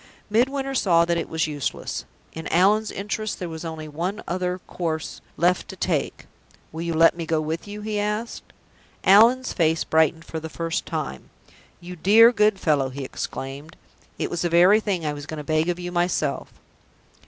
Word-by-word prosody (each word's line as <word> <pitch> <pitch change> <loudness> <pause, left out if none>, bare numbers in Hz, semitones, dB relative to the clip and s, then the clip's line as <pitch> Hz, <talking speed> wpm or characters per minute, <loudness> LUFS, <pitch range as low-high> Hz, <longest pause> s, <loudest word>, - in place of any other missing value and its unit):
Midwinter 270 +4 +1
saw 170 -9 +3
that 170 0 0
it - - -5
was 160 -1 0
useless. 145 -3 -4 0.3
In 160 0 -6
Allan's 205 +5 +3
interests 210 +2 -3
there 180 - -5
was 160 0 -7
only 160 -2 -6
one 175 +8 -4
other 180 0 -1
course 160 -3 -4 0.2
left 175 +2 +2
to - - -8
take. - - -2 0.5
"Will 160 - -6
you 170 -1 -2
let 165 +1 +5
me 165 -2 -5
go 160 -1 +1
with 160 +4 -4
you?" 205 +1 -7
he 210 0 -2
asked. 210 +3 -3 0.5
Allan's 230 +7 +5
face 160 -2 +1
brightened 160 +1 +2
for 160 - -5
the 160 0 -7
first 165 +1 -3
time. 65 -1 -5 0.5
"You 180 0 -9
dear, 220 +7 +6
good 210 -3 +2
fellow!" 145 -6 +1
he 135 +1 -6
exclaimed. 135 +4 -6 0.4
"It - - -3
was 170 - -2
the 175 - 0
very 180 +5 +6
thing 195 -7 -2
I 150 - -1
was 145 0 -8
going 155 - -6
to 150 - -5
beg 155 +3 +1
of 175 - -1
you 175 0 -5
myself." 175 -5 -1
170 Hz, 185 wpm, -24 LUFS, 160-205 Hz, 0.5 s, dear